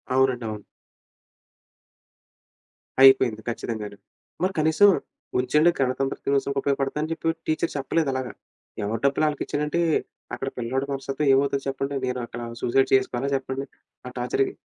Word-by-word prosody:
అవునండి. 130 -3 +2
అవును. 105 -1 -7 2.4
అయిపోయింది. 130 -4 +6
ఖచ్చితంగాను. 110 -3 -5 0.5
మరి 190 +1 +1
కనీసం 160 +6 +5 0.5
ఉంచండి 150 +7 +4
గణతంత్ర 135 +1 0
దినోత్సవనికి 140 0 +1
ఉపయోగపడతాయని 140 +3 -1
చెప్పి 165 0 -1
టీచర్ 155 +1 0
చెప్పలేదలాగా. 135 -2 -1 0.5
ఎవరి 110 +2 -2
డబ్బులు 140 +2 +2
ఆళ్ళకిచ్చేయాలంటే 150 +2 -1 0.5
అక్కడ 135 - -4
పిల్లోడి 130 +3 -1
మనస్తత్వం 135 +1 -2
ఏమవుద్దో 140 +1 +2
చెప్పండి? 135 +1 -2
నేను 125 0 -2
అక్కడ 120 +1 -8 0.2
సూసైడ్ 135 +2 +2
చేసుకోవాలా 130 0 0
చెప్పండి 135 0 -3 0.4
ఆ - - -7
టార్చర్‌కి? 125 +2 0
135 Hz, 115 wpm, -25 LUFS, 125-140 Hz, 2.4 s, అయిపోయింది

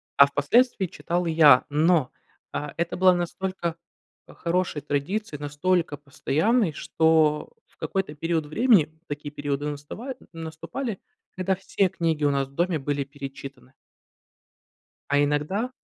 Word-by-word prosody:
а 140 - +9
впоследствии 190 - +2
читал 175 +1 -2
и 165 - 0
я. 150 -5 +7
Но, 155 -2 +3 0.4
а, 150 0 -4
это 170 0 -1
было 185 0 +6
настолько, 175 -1 -3 0.5
э, - - -14
хорошей 170 -3 -1
традицией, 150 +3 -2
настолько 150 +1 0
постоянной, 160 - +1
что, 160 -2 +2 0.2
в - - -32
какой-то 190 -6 -3
период 165 0 -1
времени 190 - +4 0.2
такие 145 0 -5
периоды 145 -1 -3
настава 150 - -6 0.2
наступали, 165 +8 -5 0.4
когда 190 0 0
все 195 0 0
книги 165 -4 -1
у 145 - +4
нас 135 -1 0
в 135 - -21
доме 175 -2 +1
были 140 0 -1
перечитаны. 135 -1 -10 1.4
А 145 0 +4
иногда 150 - -1
160 Hz, 130 wpm, -25 LUFS, 145-185 Hz, 1.4 s, а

